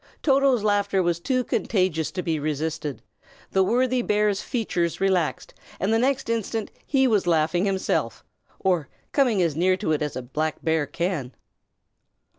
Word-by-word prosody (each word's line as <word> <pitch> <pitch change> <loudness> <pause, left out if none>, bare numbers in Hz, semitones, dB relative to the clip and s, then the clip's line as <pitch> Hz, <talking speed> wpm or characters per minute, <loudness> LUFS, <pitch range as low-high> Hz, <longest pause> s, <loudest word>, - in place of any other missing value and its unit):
Toto's 270 -5 +3
laughter 200 -2 +2
was 170 -1 0
too 255 +7 0
contagious 185 -9 0
to 180 - -3
be 160 -3 -1
resisted; 155 0 -3 0.5
the 190 - +3
worthy 250 +5 +2
bear's 210 -2 +1
features 180 -9 -2
relaxed, 180 -8 0 0.3
and 195 +4 +1
the 225 - +3
next 270 +2 +1
instant 225 -1 -2 0.2
he 270 -2 +3
was 210 -7 +2
laughing 165 +2 +2
himself, 195 -1 -1 0.3
or 180 -7 0 0.2
coming 240 -9 +3
as 165 -4 0
near 185 +3 +2
to 190 -5 -2
it 155 - +1
as 150 -2 -2
a 130 - -4
black 155 +5 -2
bear 160 -3 +1
can. 170 -8 -3
185 Hz, 155 wpm, -24 LUFS, 160-225 Hz, 0.5 s, Toto's